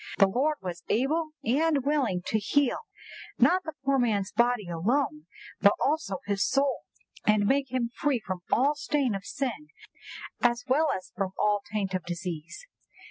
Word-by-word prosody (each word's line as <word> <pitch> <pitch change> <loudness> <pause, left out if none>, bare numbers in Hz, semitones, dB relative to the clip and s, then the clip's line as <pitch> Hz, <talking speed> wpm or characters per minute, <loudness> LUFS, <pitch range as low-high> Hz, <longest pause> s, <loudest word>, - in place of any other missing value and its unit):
"The 195 - +7
Lord 265 +10 +1
was 175 -2 -5
able 310 +7 +1 0.2
and 285 +2 +2
willing 265 -12 +1
to 220 - +1
heal, 275 +6 +1 0.6
not 370 +1 +4
the 315 - -6
poor 275 0 +3
man's 210 -5 +1
body 235 -2 +2
alone, 175 - -1 0.3
but 200 0 +6
also 295 -10 0
his 200 -1 0
soul; 275 0 +1 0.4
and 210 -1 +3
make 270 +2 +1
him 240 -2 -1
free 280 -4 +1
from 185 -4 -5
all 275 +5 +4
stain 290 -4 0
of 195 0 -5
sin 275 +2 -3 0.7
as 240 0 +2
well 300 +5 +3
as 185 - -12
from 190 -1 -2
all 210 -1 +2
taint 200 -3 -2
of 185 - -1
disease." 175 - -6
240 Hz, 160 wpm, -28 LUFS, 195-280 Hz, 0.7 s, The